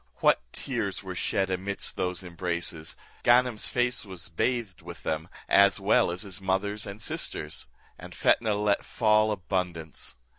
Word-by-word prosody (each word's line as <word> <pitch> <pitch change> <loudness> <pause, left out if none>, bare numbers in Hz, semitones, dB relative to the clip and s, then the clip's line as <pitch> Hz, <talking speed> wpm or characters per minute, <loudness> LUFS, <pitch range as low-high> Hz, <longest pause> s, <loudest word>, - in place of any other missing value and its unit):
What - - +4
tears - - -3
were - - -5
shed 95 -1 0
amidst 95 +2 -2
those 90 -1 -2
embraces! 85 -2 -3 0.3
Ganem's 120 -2 +4
face 125 -1 0
was 95 -5 -7
bathed 110 +3 -1
with - - -10
them, 80 0 -2 0.2
as 100 +1 +6
well 100 -2 +4
as 90 +4 -3
his 100 -1 -5
mother's 100 +3 -1
and 100 +1 -7
sisters; 75 -7 -3 0.3
and - - -9
Fetnah 110 -3 +3
let 105 0 +2
fall 110 -1 +3
abundance. 90 -8 -3
95 Hz, 145 wpm, -28 LUFS, 90-105 Hz, 0.3 s, as